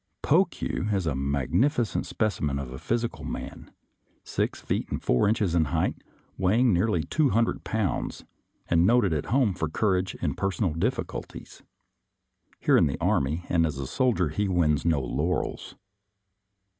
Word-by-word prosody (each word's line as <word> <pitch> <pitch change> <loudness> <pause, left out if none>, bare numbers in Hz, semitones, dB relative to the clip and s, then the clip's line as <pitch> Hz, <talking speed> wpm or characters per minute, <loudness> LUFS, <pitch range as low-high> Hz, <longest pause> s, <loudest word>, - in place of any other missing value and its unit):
Pokue 105 - +1
is 95 -3 0
a 80 - 0
magnificent 75 - 0
specimen 75 -10 -1
of 70 -2 -5
the 65 - -7
physical 120 0 -2
man - - -7 0.3
— - - -42
six - - -2
feet - - -2
and - - -2
four 60 +11 +2
inches 105 -5 +1
in 85 -2 +3
height, - - -1 0.4
weighing 110 +5 +3
nearly 90 -2 +1
two 150 - +1
hundred 115 0 +1
pounds 105 -8 -2 0.2
— - - -42
and 85 0 +3
noted 115 -7 +3
at 75 - -2
home 125 -5 +2
for 80 -3 -3
courage 95 0 0
in - - -2
personal 95 -2 -1
difficulties. 80 - -4 1.0
Here - - +4
in - - +4
the 70 - -3
army 75 +6 0
and 85 -2 +2
as 75 -4 -1
a 70 - -4
soldier 115 - +1
he 100 +7 -1
wins 80 -6 +1
no 80 -4 +3
laurels. 75 +8 -2
90 Hz, 155 wpm, -26 LUFS, 75-110 Hz, 1.0 s, Here